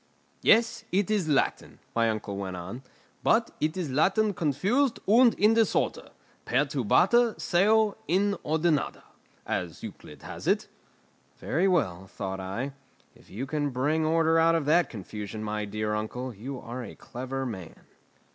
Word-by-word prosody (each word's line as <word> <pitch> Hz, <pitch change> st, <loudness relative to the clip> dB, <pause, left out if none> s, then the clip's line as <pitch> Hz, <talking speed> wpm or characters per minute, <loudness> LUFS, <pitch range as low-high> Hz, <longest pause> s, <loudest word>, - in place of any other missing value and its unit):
"Yes, 225 Hz, 0 st, +4 dB
it 200 Hz, +3 st, +1 dB
is 195 Hz, -7 st, +1 dB
Latin," 140 Hz, -, 0 dB, 0.2 s
my 115 Hz, -1 st, +3 dB
uncle 105 Hz, -2 st, -3 dB
went 95 Hz, -2 st, -4 dB
on; 95 Hz, +8 st, -7 dB, 0.4 s
"but 230 Hz, +1 st, +2 dB
it 155 Hz, +4 st, -1 dB
is 170 Hz, -7 st, -3 dB
Latin 195 Hz, -, +2 dB
confused 195 Hz, -, +1 dB
and 235 Hz, +3 st, +6 dB
in 210 Hz, +2 st, +4 dB
disorder; 225 Hz, -2 st, +1 dB, 0.3 s
"pertubata 150 Hz, -, +2 dB
seu 210 Hz, +4 st, +3 dB
inordinata," 170 Hz, -5 st, 0 dB, 0.4 s
as -, -, -3 dB
Euclid -, -, -10 dB
has -, -, -8 dB
it." -, -, +2 dB, 0.7 s
"Very 175 Hz, +7 st, 0 dB
well," 95 Hz, -, 0 dB
thought 95 Hz, -1 st, -5 dB
I, 115 Hz, +9 st, -4 dB, 0.4 s
"if -, -, -21 dB
you 115 Hz, +8 st, -5 dB
can 145 Hz, +1 st, -1 dB
bring 145 Hz, +5 st, 0 dB
order 165 Hz, +1 st, +3 dB
out 165 Hz, +1 st, +4 dB
of 160 Hz, -3 st, 0 dB
that 160 Hz, +1 st, +3 dB
confusion, 105 Hz, 0 st, -7 dB
my 105 Hz, 0 st, -2 dB
dear 105 Hz, +1 st, -2 dB
uncle, 120 Hz, +4 st, -4 dB
you 125 Hz, +6 st, -7 dB
are 120 Hz, +2 st, -6 dB
a -, -, -9 dB
clever 130 Hz, +2 st, -5 dB
man." 95 Hz, -9 st, -8 dB
145 Hz, 145 wpm, -27 LUFS, -, 0.7 s, and